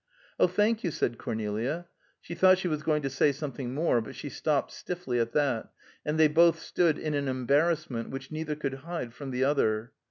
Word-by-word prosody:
"Oh, - - +6
thank 210 +5 +1
you," 175 - +1
said 120 -6 -1
Cornelia. 110 +10 -2 0.3
She 170 - -8
thought 185 +1 +6
she 185 - -2
was 155 -3 -1
going 150 -1 +1
to 135 - 0
say 140 +2 +3
something 135 -3 -5
more, 150 -6 +2
but 110 - -9
she - - -6
stopped - - 0
stiffly 175 -9 -3
at 115 0 0
that, 140 -6 +1 0.3
and 150 +1 -1
they 160 - +7
both 165 +2 +5
stood 165 -2 +1
in 155 -1 -3
an 140 -1 0
embarrassment 140 0 +1
which 135 +1 -7
neither 155 -1 -3
could 140 -3 -3
hide 165 -7 -5
from 140 +1 -7
the 130 0 0
other. 120 -4 +1
145 Hz, 200 wpm, -29 LUFS, 130-165 Hz, 0.3 s, they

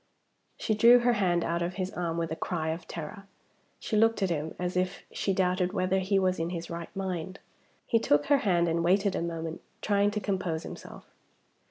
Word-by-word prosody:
She 220 - 0
drew 235 +3 +7
her 245 0 +3
hand 180 -5 +1
out 170 +1 -1
of 175 +1 -2
his 185 -1 -3
arm 170 -2 -2
with 165 -1 -2
a - - -1
cry 160 -2 -2
of 165 +1 -4
terror. 175 +5 -7 0.5
She - - -3
looked 225 -1 +3
at 185 - +1
him 155 -1 -3
as 180 0 -3
if 185 +1 -1
she 195 - -1
doubted 185 -1 +1
whether 185 -1 +1
he 195 +1 +1
was 185 -2 +1
in 165 +1 -1
his 170 -1 -5
right 170 0 -5
mind. 190 -1 -4 0.5
He 230 - +2
took 145 -8 +2
her 285 - +4
hand, 175 -6 +2
and 165 0 0
waited 195 +3 +2
a - - -1
moment 165 -1 -4 0.2
trying 205 -1 +2
to 210 0 -2
compose 185 -5 -2
himself. - - -10
180 Hz, 205 wpm, -29 LUFS, 170-200 Hz, 0.5 s, drew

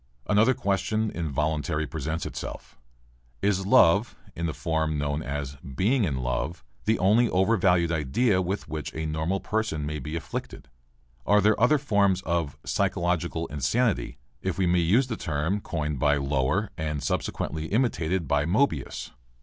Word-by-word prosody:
Another 110 +5 +4
question 105 0 0
involuntarily 75 -1 -1
presents 80 +2 -3
itself. - - -7 0.7
Is 95 -1 +1
love, 105 -2 +5 0.2
in 85 0 -2
the - - -1
form 80 -3 -1
known 75 +1 -1
as 70 -2 -4
"being 95 - 0
in 70 -6 -1
love," 65 +7 -2 0.2
the 110 +1 +3
only 110 +6 +4
overvalued 95 -3 +3
idea 90 - +2
with 95 +3 -3
which 75 -3 -5
a 80 - -3
normal 80 +5 -1
person 105 -10 -2
may 75 0 -3
be 75 +4 -5
afflicted? 80 -4 -6 0.5
Are 105 +7 +4
there 105 +2 +4
any 115 - +6
other 150 +4 +4
forms 100 -8 +2
of 85 -5 -1
"physiological 85 -1 0
insanity" 90 - 0 0.2
if 95 -3 -2
we 95 - +2
may 90 0 +3
use 100 +11 +3
the 120 -3 -4
term 80 +5 -1
coined 75 -6 -3
by 75 +2 +3
Lower 70 +8 0
and 75 -3 -2
subsequently 80 0 -2
imitated 95 - 0
by 75 +1 +2
Moebius? 90 - 0
85 Hz, 150 wpm, -26 LUFS, 75-100 Hz, 0.7 s, any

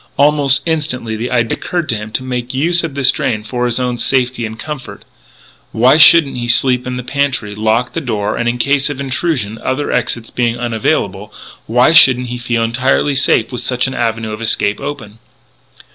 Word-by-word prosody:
Almost 145 -1 +3
instantly 145 -9 -2
the 115 +3 -4
idea 120 -3 0
occurred 175 -3 -3
to 115 - +1
him 105 0 -7
to 130 - -2
make 125 0 -4
use 170 +5 +2
of 160 -4 -5
the 140 - -3
drain 130 -4 +1
for 125 +2 -2
his 120 +1 -1
own 125 -1 -2
safety 125 -2 0
and 110 +1 -9
comfort. 150 +1 -8 0.7
Why 125 +6 +4
shouldn't 155 -3 +6
he 120 -1 -4
sleep 125 +1 +2
in 125 0 -4
the 125 - -5
pantry, 130 -6 -2
lock 110 +3 0
the 165 - -3
door, 105 -6 -2
and, 120 0 -1
in 120 - -2
case 140 +3 +1
of 145 -2 -6
intrusion, 130 -5 -2
other 145 +3 -2
exits 120 -1 -2
being 120 -1 -1
unavailable, 105 -4 -2 0.4
why 125 +5 +3
shouldn't 125 -6 +5
he 120 0 -5
feel 120 -1 -1
entirely 130 +5 0
safe 135 -4 +1
with 125 - -4
such 125 -1 0
an 135 - -3
avenue 115 -2 -2
of 110 +1 -7
escape 105 -2 +1
open? 115 -7 -7
125 Hz, 190 wpm, -15 LUFS, 115-135 Hz, 0.7 s, shouldn't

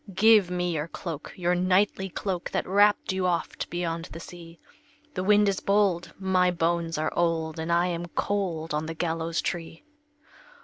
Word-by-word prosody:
"Give 210 -2 +6
me 180 0 -1
your 155 -1 -2
cloak, 165 -3 -6
your 175 -1 +1
knightly 190 +2 +2
cloak, 185 -1 -3
That - - -1
wrapped 205 +1 +3
you 190 -1 0
oft 170 -2 -2
beyond 170 -1 -3
the 165 - -9
sea; 170 0 -11 0.6
The 185 - -2
wind 210 +1 +4
is 195 -1 +1
bold, 200 -4 +1
my 185 -1 +2
bones 170 -1 0
are 155 - -1
old, 165 -2 0
And 160 +1 -2
I 170 +1 +3
am 175 -1 -3
cold 170 -4 -2
on 155 +1 -1
the 165 - -5
gallows 165 0 -1
tree." 165 -1 -5
175 Hz, 170 wpm, -27 LUFS, 165-190 Hz, 0.6 s, Give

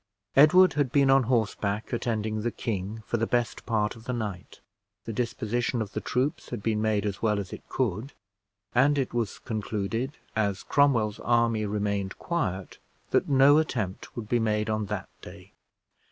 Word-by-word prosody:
Edward 180 +6 +7
had 145 -4 0
been 140 -2 +4
on 135 0 +6
horseback, 110 -2 0
attending 110 -2 -1
the 120 - 0
king, 110 -1 -4
for 120 - -1
the 115 0 0
best 120 -2 -1
part 110 -2 0
of 115 0 -14
the 125 - -2
night; 105 -6 -5 0.5
the 115 - -4
disposition 120 +1 -1
of 105 -3 -4
the - - -3
troops 145 +6 -1
had 120 -5 -5
been 110 -1 0
made 110 -1 +1
as 100 -2 -3
well 105 -2 +2
as 95 -3 -6
it - - -7
could; 125 +2 -2 0.6
and 140 +4 +4
it 135 -3 -1
was 115 -4 -1
concluded, 115 +4 -3 0.2
as 100 -3 0
Cromwell's 120 -7 +2
army 115 -2 +2
remained 100 -1 -2
quiet, 95 - -3 0.3
that - - +2
no 140 +2 +6
attempt 110 -11 -3
would 115 -3 -5
be 120 +2 +2
made 110 -1 0
on 110 -1 -1
that 105 -1 -4
day. - - -12
115 Hz, 170 wpm, -27 LUFS, 105-125 Hz, 0.6 s, Edward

